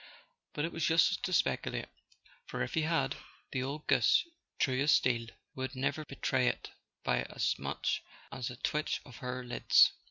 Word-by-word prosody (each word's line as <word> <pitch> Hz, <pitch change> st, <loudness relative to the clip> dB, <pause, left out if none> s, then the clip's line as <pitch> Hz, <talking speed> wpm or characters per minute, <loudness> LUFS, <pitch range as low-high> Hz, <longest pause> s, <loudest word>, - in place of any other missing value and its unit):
But 150 Hz, -, -1 dB
it 170 Hz, -, -4 dB
was 165 Hz, -, 0 dB
useless 165 Hz, 0 st, +4 dB
to 185 Hz, -, -3 dB
speculate, 175 Hz, -, +1 dB, 0.6 s
for -, -, -2 dB
if -, -, -5 dB
he 160 Hz, -, +2 dB
had, 165 Hz, +1 st, +1 dB, 0.3 s
the 130 Hz, -, -1 dB
old 140 Hz, +4 st, -4 dB
goose, -, -, +4 dB, 0.3 s
true 130 Hz, 0 st, +1 dB
as 145 Hz, +1 st, +4 dB
steel, 115 Hz, -2 st, +2 dB, 0.3 s
would 130 Hz, +1 st, -4 dB
never 135 Hz, +4 st, -1 dB
betray 130 Hz, -2 st, 0 dB
it -, -, -2 dB, 0.3 s
by -, -, +2 dB
as -, -, 0 dB
much -, -, -1 dB, 0.3 s
as 130 Hz, -3 st, -3 dB
a 125 Hz, -, -7 dB
twitch 150 Hz, +5 st, -1 dB
of 125 Hz, -, -12 dB
her 125 Hz, 0 st, -4 dB
lids. 120 Hz, -, +5 dB
130 Hz, 170 wpm, -32 LUFS, 125-155 Hz, 0.6 s, lids